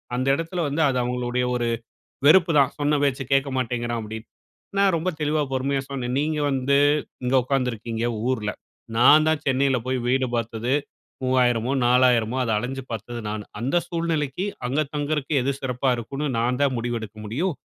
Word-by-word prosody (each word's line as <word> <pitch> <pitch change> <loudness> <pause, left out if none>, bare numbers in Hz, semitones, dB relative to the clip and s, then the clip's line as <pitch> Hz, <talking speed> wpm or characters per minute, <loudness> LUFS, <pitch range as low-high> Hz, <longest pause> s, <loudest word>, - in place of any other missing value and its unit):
அந்த 130 +2 -1
இடத்தில 165 +3 -3
வந்து 145 +3 -1
அது 130 - 0
அவங்களுடைய 125 0 -1
ஒரு 120 -1 0 0.6
வெறுப்புதான் 155 -4 +5
சொன்ன 145 0 +2
பேச்சு 140 -1 +1
கேட்க 135 +1 +3
மாட்டேங்கிறான் 120 -1 -2
அப்டின்னு. 110 +1 -8 0.5
நான் 200 -2 +4
ரொம்ப 165 +3 -2
தெளிவா 150 0 +1
பொறுமையா 135 +1 0
சொன்னேன் 125 -3 -3
நீங்க 150 +1 0
வந்து 135 +1 +1 0.5
இங்க 125 +1 0
உட்காந்துருக்கீங்க, 120 -4 -2 0.2
ஊர்ல. 110 -5 -1 0.5
நான் 150 +6 +6
தான் 160 -1 +1
சென்னையில 135 -1 +2
போய் 130 0 0
வீடு 130 +1 +2
பார்த்தது 115 +1 -2 0.5
3000மோ 125 -2 +2
4000மோ 125 -1 +3
அத 115 - -1
அலஞ்சு 130 +5 -3
பார்த்தது 115 +2 -5
நான். 105 0 -4 0.2
அந்த 130 +9 +1
சூழ்நிலைக்கு 165 -1 -1 0.2
அங்க 135 +4 0
தங்குறதுக்கு 150 0 -1
எது 135 +3 0
சிறப்பா 130 0 -1
இருக்கும்ன்னு 135 +6 -4
நான் 125 +2 0
தான் 140 -2 +2
முடிவெடுக்க 115 -2 -4
முடியும். 155 - -1
130 Hz, 155 wpm, -24 LUFS, 120-145 Hz, 0.6 s, நான்